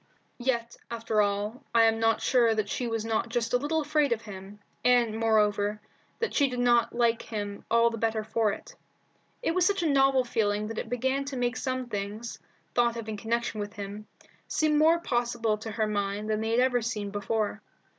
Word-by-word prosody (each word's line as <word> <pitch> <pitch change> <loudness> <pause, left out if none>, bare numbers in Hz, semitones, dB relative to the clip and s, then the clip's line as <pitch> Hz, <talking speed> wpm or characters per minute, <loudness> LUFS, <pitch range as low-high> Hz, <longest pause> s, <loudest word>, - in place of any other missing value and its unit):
Yet, 235 -2 -1
after 230 -2 0
all, 205 +5 -1
I 230 - +7
am 225 0 +3
not 225 -1 +2
sure 235 -3 +4
that 215 -1 -1
she 245 - -2
was 225 -1 -2
not 225 +1 -1
just 230 0 -1
a - - +6
little 315 +4 0
afraid 300 -1 +1
of 230 -1 0
him, 195 0 -9 0.3
and, 240 -3 +4
moreover, 210 -2 +2 0.4
that 465 - -2
she 280 -2 +3
did 250 - -4
not 240 -1 +3
like 235 -1 +2
him 205 -2 -5
all 235 0 +4
the 230 - -5
better 220 -1 0
for 220 0 +1
it. - - -8 0.7
It 330 - +1
was 365 0 +2
such 390 -1 +2
a - - +2
novel 270 -2 +4
feeling 215 -4 0
that 225 - -4
it - - -5
began 260 +3 0
to 275 -1 -5
make 245 0 0
some 255 -1 -2
things, 210 +1 -5 0.3
thought 235 -1 +2
of 225 -1 -6
in 215 - -3
connection 230 +1 -2
with 205 0 -4
him, 205 0 -7 0.4
seem 310 -1 +1
more 320 +2 +5
possible 240 -6 0
to 225 - -6
her 220 0 0
mind 205 0 -2
than 215 0 0
they 220 - -1
had 230 +2 +3
ever 250 -1 +2
seemed 210 -3 -3
before. 210 +1 -2
230 Hz, 205 wpm, -28 LUFS, 215-245 Hz, 0.7 s, I